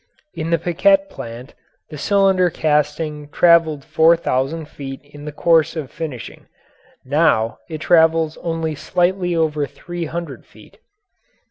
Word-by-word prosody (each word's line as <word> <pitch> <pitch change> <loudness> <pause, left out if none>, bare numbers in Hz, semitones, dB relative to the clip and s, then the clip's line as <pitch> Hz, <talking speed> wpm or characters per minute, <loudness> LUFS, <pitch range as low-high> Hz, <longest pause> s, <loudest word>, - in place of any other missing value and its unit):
In 160 0 -4
the 170 - +3
Piquette 195 +4 +2
plant 120 +3 -9 0.4
the 150 - -7
cylinder 190 0 +3
casting 150 -1 -1
traveled 165 -3 +3
four 165 +1 +4
thousand 155 +1 -2
feet 135 -2 -8
in 145 0 -13
the 150 - -5
course 165 +1 +2
of 150 -5 -5
finishing; 150 -8 -7 0.6
now 130 -6 +1
it 155 -2 -6
travels 160 -2 +3
only 165 -2 -3
slightly 180 +3 0
over 155 -3 0
three 175 +5 -7
hundred 170 +2 -6
feet. - - -19
160 Hz, 130 wpm, -19 LUFS, 150-170 Hz, 0.6 s, four